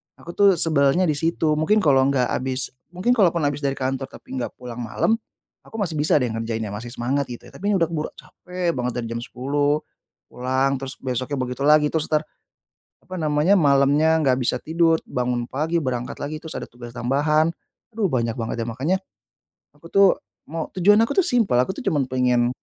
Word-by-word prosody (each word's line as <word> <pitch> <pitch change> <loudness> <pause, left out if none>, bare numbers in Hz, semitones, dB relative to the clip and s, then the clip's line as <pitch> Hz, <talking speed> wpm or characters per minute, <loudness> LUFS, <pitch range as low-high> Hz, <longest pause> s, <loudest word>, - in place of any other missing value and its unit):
aku 170 - -10
tuh 200 -1 +6
sebelnya 155 0 +3
di - - +3
situ. 160 0 0
Mungkin 210 +7 +2
kalau 135 -3 +4
nggak 130 -3 +1
habis 130 0 -2 0.2
mungkin 185 +7 -1
kalaupun 175 -6 +3
habis 145 0 0
dari 140 -2 0
kantor 135 0 -2
tapi 130 - -9
nggak 125 - -3
pulang 125 -2 -8
malam 120 - 0 0.5
aku - - -14
masih 170 -5 -2
bisa 150 +1 +1
deh 125 - 0
ngerjainnya, 115 -1 -3
masih 115 +3 -6
semangat, 135 +3 -1
gitu 120 - -8
ya. - - -15
Tapi 205 +2 -1
ini - - +3
udah 165 - +2
keburu 155 -2 -2
capek 180 -1 -4
banget, 125 -1 -2
dari 120 - -4
jam 115 - -3
10.00 145 +4 0 0.5
pulang, 130 +2 0
terus 135 0 -4
besoknya 130 +2 -3
begitu 125 +1 -3
lagi. 150 0 +5
Terus 160 -2 0
tar, 155 -1 +3 0.8
apa 185 - -10
namanya, 155 +4 +3
malamnya 145 +1 +4
nggak 130 -3 +3
bisa 125 - +1
tidur, 165 0 +2
bangun 125 -1 -1
pagi, 160 +5 0
berangkat 125 -3 -3
lagi, 155 +2 -4
terus 160 - -6
ada - - -6
tugas 120 0 -10
tambahan. 145 +6 +2 0.5
Aduh, 220 -3 +2
banyak 115 -3 0
banget 115 0 -3
ya. - - -7
Makanya 135 +11 0 0.8
aku 150 - -21
tuh 195 0 +7 0.4
mau 160 0 -3
tujuan 200 +3 +5
aku 230 - -5
tuh - - -3
simpel, 230 - +2
aku 130 - -1
tuh - - -6
cuman 150 -9 +1
pengen 125 -1 +2
140 Hz, 195 wpm, -23 LUFS, 125-160 Hz, 0.8 s, tuh